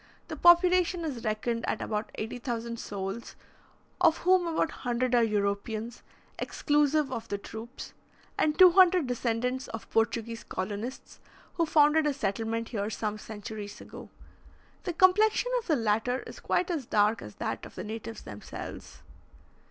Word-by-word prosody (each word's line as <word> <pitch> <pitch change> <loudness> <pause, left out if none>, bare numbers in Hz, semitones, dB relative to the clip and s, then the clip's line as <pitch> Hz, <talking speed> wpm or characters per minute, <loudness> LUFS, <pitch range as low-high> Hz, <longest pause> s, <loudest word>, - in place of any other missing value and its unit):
The - - -4
population 350 0 +5
is 260 -7 -4
reckoned 230 +1 -1
at - - -1
about 210 0 -3
80,000 235 0 -4
souls, 195 +3 -5 0.7
of 330 -2 +5
whom 365 -1 +4
about 325 -1 +1
100 245 0 0
are 240 - +5
Europeans, 215 +2 -1 0.4
exclusive 295 -1 +1
of 230 -2 -4
the 205 - -2
troops, 225 +5 -9 0.4
and 300 -1 +1
200 365 -2 +7
descendants 250 +1 -1
of 225 -2 -7
Portuguese 230 0 0
colonists, 205 +6 -5 0.3
who 335 -2 0
founded 300 0 +4
a 295 - +1
settlement 225 -1 -2
here 205 -3 -2
some 215 0 -3
centuries 210 -1 -7
ago. - - -11 0.8
The 355 - -2
complexion 420 +7 +4
of 465 - -11
the 315 - +3
latter 225 +2 0
is - - -10
quite 365 0 0
as 295 -8 -3
dark 210 +2 +2
as - - -10
that - - -4
of - - -11
the - - -5
natives 225 +1 -7
themselves. 105 0 -9
235 Hz, 145 wpm, -29 LUFS, 220-310 Hz, 0.8 s, 200